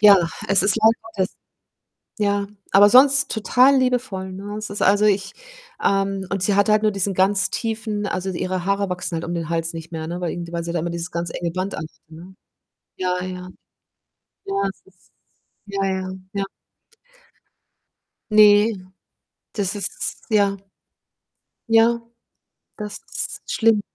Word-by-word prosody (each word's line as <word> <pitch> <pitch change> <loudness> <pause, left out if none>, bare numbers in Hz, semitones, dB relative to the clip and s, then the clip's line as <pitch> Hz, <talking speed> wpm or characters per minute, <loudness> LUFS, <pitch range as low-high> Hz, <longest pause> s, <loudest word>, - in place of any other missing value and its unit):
ja, 205 -1 +9 0.3
es 195 -2 +4
ist 195 +2 +2
leider 220 -3 +2 0.9
ja, 200 -1 +1 0.3
aber 205 +1 +7
sonst 270 +3 +6
total 250 +5 +4
liebevoll, 245 -7 -1
ne? 200 +2 -7
Es 215 0 -5
ist 205 - -5
also, 205 +2 +4
ich, 200 -1 +1 0.5
ähm 195 -1 0
und 195 -2 -1
sie 205 - +2
hat 200 0 +3
halt 215 0 +3
nur 215 - +3
diesen 195 0 -1
ganz 190 +1 +2
tiefen 220 -2 -3
also, 185 0 -3
ihre 185 0 -3
Haare 200 0 0
wachsen 180 -1 -3
halt 165 - -3
um 170 - -4
den 165 -2 -4
Hals 165 0 -1
nicht 165 0 -8
mehr, 160 -1 -5
ne, 175 +2 -4
weil 175 - -1
irgendj 170 -1 -6
weil 170 - -2
sie 170 0 -4
da 175 - 0
immer 170 +2 -2
dieses 170 +1 -4
ganz 170 0 -3
enge 170 -1 -3
Band 185 +3 -3
anhat, 155 - -5 0.2
ne? 170 +4 -13 0.6
Ja, 180 -1 -1
ja. 185 0 -6 1.0
Ja 195 - -3
das 195 - -7
ist 190 -1 -26 0.5
ja, 200 -1 -4
ja, 190 -1 -2 0.2
ja. 200 -1 -1 1.9
Ne, 210 +1 +6 0.8
das 200 -1 -1
ist 205 - -4
ja. 200 -2 +2 1.1
Ja, 230 +1 +4 0.8
das 210 -2 -6
ist - - -4
schlimm. 225 -3 +3
195 Hz, 155 wpm, -22 LUFS, 180-210 Hz, 1.9 s, ja